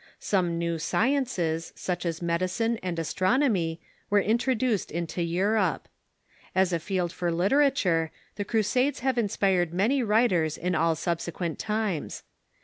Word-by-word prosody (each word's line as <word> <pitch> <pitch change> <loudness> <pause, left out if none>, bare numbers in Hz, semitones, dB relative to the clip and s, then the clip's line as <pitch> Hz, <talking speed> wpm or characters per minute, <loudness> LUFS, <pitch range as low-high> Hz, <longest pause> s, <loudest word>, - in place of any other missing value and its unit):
Some 175 -4 0
new 170 -1 -1
sciences, 180 - 0
such 180 -1 -3
as 165 +1 -3
medicine 185 +7 0
and 180 -2 -3
astronomy, 185 - +1 0.3
were 205 - +4
introduced 235 +1 +1
into 170 +1 -3
Europe. 185 +2 0 0.7
As 185 -1 +3
a 170 - +1
field 180 0 -2
for 175 -1 -1
literature, 185 - +2 0.3
the 205 - -2
Crusades 235 +7 +1
have 260 -1 +1
in 215 -3 +1
spired 180 -4 +1
many 235 +9 +2
writers 210 -9 +2
in 180 +2 -1
all 165 0 +2
subsequent 170 0 -3
times. 210 -7 -2
185 Hz, 135 wpm, -27 LUFS, 170-225 Hz, 0.7 s, were